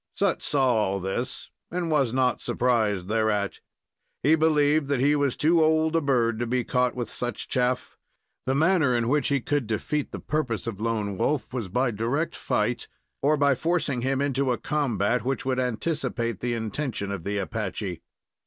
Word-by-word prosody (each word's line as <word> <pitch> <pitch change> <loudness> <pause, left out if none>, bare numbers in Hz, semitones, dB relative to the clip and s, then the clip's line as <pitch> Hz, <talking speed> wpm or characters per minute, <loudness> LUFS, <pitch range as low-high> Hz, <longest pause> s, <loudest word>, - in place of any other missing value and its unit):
Sut 195 -3 +1
saw 135 -3 +2
all 100 -3 +1
this 95 +7 -4 0.2
and 170 -1 -2
was 140 -6 +2
not 130 -1 +1
surprised 110 -7 +1
thereat. 105 -2 0 0.6
He 150 +5 +5
believed 155 -2 +3
that 140 -2 0
he 145 +3 +4
was 140 -3 +1
too 160 +2 +4
old 160 +1 +2
a 165 - +3
bird 120 -5 +1
to 120 - -1
be 125 +1 0
caught 125 0 +1
with 120 -3 -3
such 120 0 -3
chaff. 125 0 -1 0.5
The 130 - +2
manner 160 -4 +3
in 120 0 +1
which 145 0 +2
he 140 -2 +1
could 145 -2 -1
defeat 140 +7 -2
the - - -5
purpose 130 -10 -2
of 110 -3 -5
Lone 105 -4 -1
Wolf 145 -3 0
was 115 -7 -3
by 125 +6 +1
direct 120 +10 -1
fight, 115 +3 -1 0.3
or 150 +2 +3
by 140 -1 +4
forcing 155 -3 0
him 135 +2 0
into 135 -2 +1
a 120 - 0
combat 125 -6 0
which 135 +1 -2
would 130 -1 0
anticipate 125 - -1
the 120 -1 -1
intention 110 -2 -3
of 100 -5 -4
the 100 +2 -2
Apache. 95 -2 -3
125 Hz, 180 wpm, -26 LUFS, 115-145 Hz, 0.6 s, He